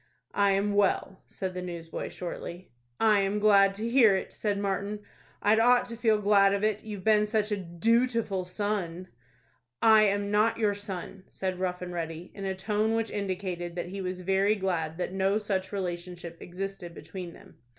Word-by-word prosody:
"I 200 -1 +3
am 200 +1 +1
well," 195 -1 +1
said 190 -2 -5
the 180 - -4
newsboy, 170 -2 -5
shortly. 175 0 -7 0.3
"I 215 -2 +5
am 195 +1 0
glad 200 -2 +5
to 220 +3 -3
hear 235 -5 +5
it," 190 - -4
said 205 -2 -1
Martin; 200 +1 -2 0.4
"I'd 215 +2 +4
ought 245 +2 +5
to 230 - -5
feel 225 -2 +3
glad 200 -1 +4
of 200 - -3
it, 215 -1 0
you've 210 -3 -7
been 210 0 +4
such 215 0 0
a - - +2
dootiful 215 +3 0
son." 185 -2 -3 0.7
"I 220 -1 +6
am 200 0 0
not 215 +2 +3
your 215 -3 +2
son," 195 -1 -6
said 185 -1 -3
Rough 180 -1 -2
and 180 0 -6
Ready, 165 0 -5
in 195 - -6
a 190 0 -1
tone 215 +3 0
which 225 0 -1
indicated 185 -3 -3
that 175 0 -4
he 195 +1 -5
was 185 0 -4
very 195 +3 +2
glad 170 -5 -2
that 180 0 -3
no 195 +2 +2
such 195 -3 -2
relationship 175 -3 -5
existed 180 -1 -6
between 170 +2 -8
them. - - -17
195 Hz, 180 wpm, -28 LUFS, 180-210 Hz, 0.7 s, I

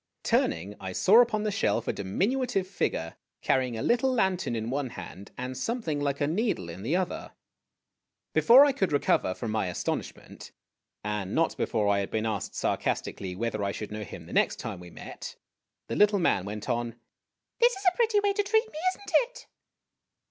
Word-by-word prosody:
Turning, 90 +5 +1
I 95 -1 -5
saw 210 - +6
upon 220 -3 +1
the 215 - 0
shelf 220 - 0
a - - +1
diminutive 195 - 0
figure 85 - -2 0.3
carrying 130 -3 +1
a 110 - -3
little 245 +2 +2
lantern 190 - +1
in 115 +1 -3
one 140 -1 -1
hand, 95 0 -9
and 125 +1 -4
something 160 - -2
like 140 -1 -1
a 145 - +2
needle 165 - -1
in 90 - -9
the 130 - 0
other. 185 -1 -2 1.0
Before 255 +4 +8
I 285 - +3
could 200 -9 0
recover 115 -9 +2
from 115 -3 -4
my 110 -3 0
astonishment, 90 - -5 0.5
and 105 -2 -3
not 165 0 +2
before 105 -2 0
I 100 -1 +3
had 100 - -2
been 110 0 -1
asked 110 -3 -3
sarcastically 95 -2 -2
whether 110 0 -2
I 100 - 0
should 105 +1 -6
know 105 0 -4
him 95 - -9
the - - -10
next - - +3
time - - -6
w 90 0 -11
r - - -18
e - - -10
met, - - -8 0.5
the - - -4
little 210 0 +5
man 135 - +2
went 105 +1 -6
on: 120 -2 -1 0.3
" - - -59
This 480 +1 +5
is 390 -1 -8
a 365 0 +4
pretty 450 -3 +3
way 405 -1 +2
to 410 - +1
treat 440 +2 +1
me, 305 - -7
is - - -10
n't 400 -1 -9 0.2
it - - -14
140 Hz, 200 wpm, -28 LUFS, -, 1.0 s, Before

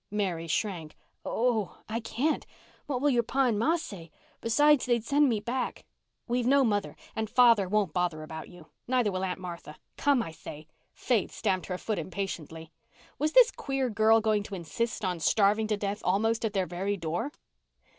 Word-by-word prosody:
Mary 185 -5 -2
shrank. 170 -3 -2 0.3
"Oh—I 225 -1 -1
can't. 245 +7 -1 0.4
What 255 -3 -2
will 290 0 +3
your 240 -2 +3
pa 265 +4 +1
and 225 -4 +1
ma 320 +9 +3
say? 195 - -7 0.3
Besides, 290 +5 +4
they'd 240 -2 +2
send 285 +4 +3
me 225 -3 +1
back." 245 +4 -3 0.4
"We've 245 0 0
no 275 +1 +5
mother, 205 -4 0 0.2
and 220 -1 -2
father 230 -7 +5
won't 205 -5 +1
bother 175 -3 -1
about 160 0 -8
you. 175 -3 -14 0.2
Neither 245 -4 +2
will 185 0 -2
Aunt 185 0 -2
Martha. 170 -4 -8 0.2
Come, 280 -5 +3
I 165 - -7
say." 155 -1 -10 0.3
Faith 230 -7 0
stamped 190 -4 -1
her 180 - -3
foot 210 0 -2
impatiently. 165 -3 -5 0.5
Was 305 +2 0
this - - +7
queer 270 -3 -2
girl 220 +1 +4
going 215 -1 +2
to 200 -1 -7
insist 205 +5 -3
on 180 -2 -1
starving 210 +5 +3
to 210 -1 0
death 200 0 -3
almost 225 +5 +1
at 220 - -2
their 190 -2 +1
very 190 +4 -2
door? 170 - -3
210 Hz, 175 wpm, -29 LUFS, 180-240 Hz, 0.5 s, this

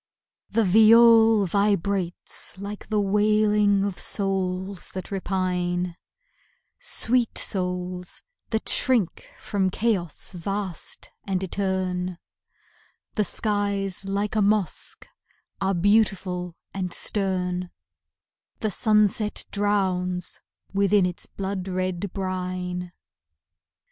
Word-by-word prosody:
The 230 - +2
viol 225 +1 +7
vibrates 200 -2 -1
like 200 +2 -7
the 215 -1 +1
wailing 210 0 +3
of 200 -2 -2
souls 190 -1 -1
that 185 +1 -6
repine; 180 -2 -1 0.8
Sweet 250 - +1
souls 180 -1 -2 0.3
that 220 -1 -2
shrink 235 -9 +2
from 195 -2 0
chaos 190 -6 -1
vast 190 0 -5
and 190 -2 0
etern, 185 -2 -2 1.0
The 215 - +1
skies 200 -2 -1
like 200 +2 -2
a 215 - +3
mosque 205 -4 0 0.5
are 195 0 +1
beautiful 185 -2 +1 0.2
and 185 -2 -3
stern, 180 -2 0 0.9
The 215 -2 0
sunset 210 0 +2
drowns 185 -3 0 0.3
within 200 0 +3
its 180 -1 -4
blood 195 -1 -4
red 185 0 -2
brine. 180 -2 -3
195 Hz, 90 wpm, -25 LUFS, 180-210 Hz, 1.0 s, viol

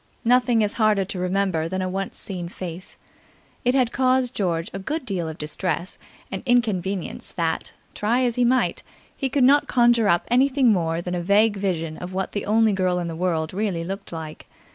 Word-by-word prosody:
Nothing 245 -2 +4
is 210 - 0
harder 210 -3 +3
to 185 -1 -5
remember 180 -3 0
than 185 +1 -2
a - - -1
once 195 +1 -4
seen 180 -4 -4
face. 180 0 -6 0.7
It 250 +2 +2
had 250 -3 +2
caused 255 -1 +2
George 170 -4 -1
a 195 - -4
good 300 +10 -3
deal 180 -7 -2
of 160 - -8
distress 175 +3 -3 0.3
and - - -4
inconvenience 200 -6 0
that, 165 -2 -2 0.2
try 235 +5 +1
as 245 -2 +1
he 245 - +1
might, 255 +2 +2 0.3
he 270 - -2
could 275 0 +2
not 285 +3 +5
conjure 240 -3 +4
up 170 0 +2
anything 260 0 +4
more 165 -2 -1
than 180 - -4
a 175 - -1
vague 205 +4 +3
vision 165 -5 -2
of 180 +1 -7
what 190 0 -2
the 205 - -4
only 220 0 +3
girl 185 -2 +1
in 175 -1 -2
the 165 - -5
world 165 -2 -1
really 190 -4 -1
looked 195 +3 -5
like. 160 -2 -7
195 Hz, 195 wpm, -23 LUFS, 175-235 Hz, 0.7 s, not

